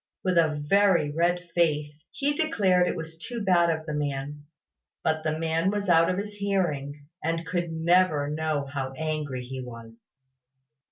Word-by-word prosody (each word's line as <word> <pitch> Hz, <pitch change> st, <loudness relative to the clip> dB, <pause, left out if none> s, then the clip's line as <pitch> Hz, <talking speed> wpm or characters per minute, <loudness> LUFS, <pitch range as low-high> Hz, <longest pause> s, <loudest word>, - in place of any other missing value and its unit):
With 185 Hz, -2 st, +3 dB
a 155 Hz, -2 st, +2 dB
very 195 Hz, -5 st, +4 dB
red 175 Hz, +3 st, 0 dB
face, 150 Hz, -3 st, 0 dB
he 285 Hz, +1 st, -1 dB
declared 195 Hz, -, +2 dB
it -, -, -1 dB
was 160 Hz, -1 st, -7 dB
too 240 Hz, +7 st, -5 dB
bad 180 Hz, -4 st, +3 dB
of 160 Hz, -1 st, -1 dB
the 155 Hz, -, -4 dB
man: 145 Hz, 0 st, -3 dB, 0.6 s
but 160 Hz, 0 st, 0 dB
the 155 Hz, 0 st, -1 dB
man 165 Hz, +2 st, +1 dB
was 205 Hz, -1 st, -2 dB
out 165 Hz, -1 st, +5 dB
of 185 Hz, -, 0 dB
his 205 Hz, +1 st, -4 dB
hearing, 160 Hz, -9 st, -2 dB, 0.2 s
and 165 Hz, +1 st, -1 dB
could 175 Hz, 0 st, -2 dB
never 165 Hz, -2 st, +3 dB
know 150 Hz, -1 st, -1 dB
how 135 Hz, -1 st, -4 dB
angry 150 Hz, -4 st, -3 dB
he 130 Hz, +1 st, -6 dB
was. 115 Hz, -2 st, -11 dB
160 Hz, 165 wpm, -27 LUFS, 145-180 Hz, 0.6 s, out